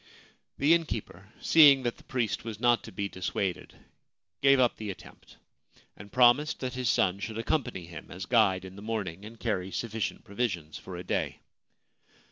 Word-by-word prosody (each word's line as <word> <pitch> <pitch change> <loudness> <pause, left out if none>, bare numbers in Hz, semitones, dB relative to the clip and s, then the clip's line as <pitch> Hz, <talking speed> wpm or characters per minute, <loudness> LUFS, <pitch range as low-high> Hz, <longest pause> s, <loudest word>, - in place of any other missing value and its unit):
The 145 +4 +4
innkeeper, 110 - -3
seeing 145 -5 +7
that 120 -1 -2
the - - -18
priest 120 -5 -2
was 110 -2 -6
not 120 0 +3
to - - -9
be 100 +2 -3
dissuaded, 95 0 -3 0.7
gave 135 0 +5
up 125 -2 +3
the 110 -2 -5
attempt, 95 - -11 0.6
and 100 +1 -13
promised 130 +5 +4
that 130 0 -3
his 125 -3 -1
son 95 0 +2
should 110 +2 -5
accompany 115 - -2
him 85 0 -10
as 95 +3 -7
guide 100 -6 +3
in 95 0 -10
the 100 - -10
morning, 105 -5 -4
and 115 +1 -11
carry 95 -5 -2
sufficient 110 +1 -3
provisions 95 -8 -3
for 95 - -9
a 90 - -6
day. - - -2
110 Hz, 170 wpm, -29 LUFS, 95-125 Hz, 0.7 s, seeing